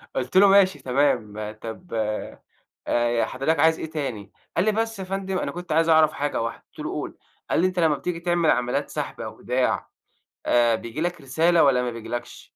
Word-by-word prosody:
آه - - +1
قُلت 130 +8 -1
له: 200 +1 +8
"ماشي 195 -1 +5
تمام 110 -6 0
طب 115 +10 -8
آآ 110 -1 -3 0.5
ي 120 -1 +2
حضرتك 145 +4 -1
عايز 160 +1 +4
إيه 160 - -5
تاني؟" 125 -11 -5 0.2
قال 175 - +2
لي: 215 - +4
"بس 225 0 -2
يا - - -3
فندم 190 0 -3
أنا - - -2
كنت 175 -1 -8
عايز 165 +1 +3
اعرف 155 -1 +5
حاجة 145 -5 -2
واحده،" 115 - -4
قُلت - - -14
له: - - -3
"قُل" - - -7 0.3
قال - - +2
لي: 185 - +4
"أنت 185 -1 -3
لمّا 160 -3 +3
بتيجي 175 +1 -4
تعمل 170 -1 +1
عمليات 125 0 0
سحب - - -5
أو - - -7
إيداع، - - 0 0.6
آآ 120 -1 +4
بييجي 115 +7 -6
لك 175 -1 -2
رسالة، 160 +5 +3
والّا 135 -3 +4
ما 125 - -2
بييجيلكش؟" 115 +1 -7
155 Hz, 205 wpm, -24 LUFS, 120-175 Hz, 0.6 s, له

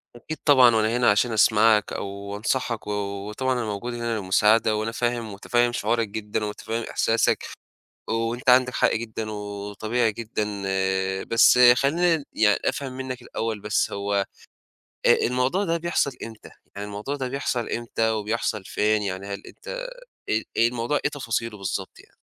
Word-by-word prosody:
أكيد 155 +7 -7
طبعًا 130 -5 +7
وأنا 110 +2 +2
هنا 125 -3 +4
عشان 110 +4 +2
أسمعك 110 0 +4
أو 100 0 -5
أنصحك 115 +1 -2
و - - -2 0.4
وطبعًا 130 +5 -1
أنا 120 -2 -2
موجود 110 +3 -4
هنا 115 -1 -2
للمساعدة 105 +3 +3
وأنا 110 +1 -2
فاهم 120 -1 -1
ومُتفهِّم 120 +4 +1
شُعورك 115 -1 0
جدًا 105 +1 -3
ومُتفهِّم 110 +2 -4
إحساسك 115 +1 +1 0.7
وأنت 115 +3 0
عندك 125 0 +5
حق - - +2
جدًا 110 -1 -4
وطبيعي 105 +3 -2
جدًا، 110 0 -3 0.8
بس 115 +2 +5 0.2
خلّيني 160 +3 +2
يعني 105 -2 +3
أفهم 135 -2 -2
منّك 130 -1 -5
الأول 110 -1 -4
بس 105 +1 0
هو 100 0 -3 0.9
آآ - - +8
الموضوع 125 +10 +1
ده 165 -3 0
بيحصل 170 -4 0
إمتى؟ 110 -2 -11 0.2
يعني 100 +1 -5
الموضوع 105 +8 -4
ده 130 -2 -3
بيحصل 125 -3 -2
إمتى 115 -1 -1
وبيحصل 110 -1 -2
فين؟ 105 +2 +1
يعني 95 -1 -4
هل 100 0 -6
أنت - - -14 0.6
آآ 110 +1 +1
الموضوع 120 +4 +1
إيه 150 - +2
تفاصيله 115 -6 -3
بالضبط 95 0 -4
يعني؟ - - -19
115 Hz, 150 wpm, -24 LUFS, 105-125 Hz, 0.9 s, آآ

